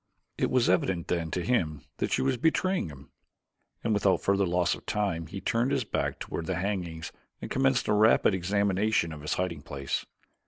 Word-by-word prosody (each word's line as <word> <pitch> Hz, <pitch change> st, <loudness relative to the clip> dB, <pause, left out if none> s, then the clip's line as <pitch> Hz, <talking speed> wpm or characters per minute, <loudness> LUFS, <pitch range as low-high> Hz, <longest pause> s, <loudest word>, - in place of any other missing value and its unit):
It -, -, 0 dB
was 125 Hz, -2 st, +3 dB
evident 90 Hz, -1 st, +1 dB
then 85 Hz, -2 st, 0 dB
to 90 Hz, +2 st, -2 dB
him 80 Hz, -, 0 dB
that -, -, -1 dB
she -, -, +2 dB
was 135 Hz, -1 st, +2 dB
betraying 165 Hz, -, +1 dB
him, 70 Hz, -1 st, -13 dB, 0.7 s
and 115 Hz, -, +1 dB
without 100 Hz, -2 st, +3 dB
further 100 Hz, -1 st, +2 dB
loss 90 Hz, 0 st, +2 dB
of -, -, -9 dB
time 90 Hz, -6 st, -1 dB
he 95 Hz, +4 st, -6 dB
turned 115 Hz, +6 st, +1 dB
his 135 Hz, -2 st, +1 dB
back 110 Hz, -, -2 dB
toward 80 Hz, -, -5 dB
the -, -, 0 dB
hangings 90 Hz, -4 st, -3 dB, 0.3 s
and -, -, -7 dB
commenced 135 Hz, -1 st, +2 dB
a -, -, +3 dB
rapid 105 Hz, 0 st, +5 dB
examination 100 Hz, -1 st, +1 dB
of 75 Hz, -, -9 dB
his 75 Hz, -, -1 dB
hiding 90 Hz, -4 st, -2 dB
place. 70 Hz, -1 st, -4 dB
95 Hz, 190 wpm, -28 LUFS, 85-110 Hz, 0.7 s, rapid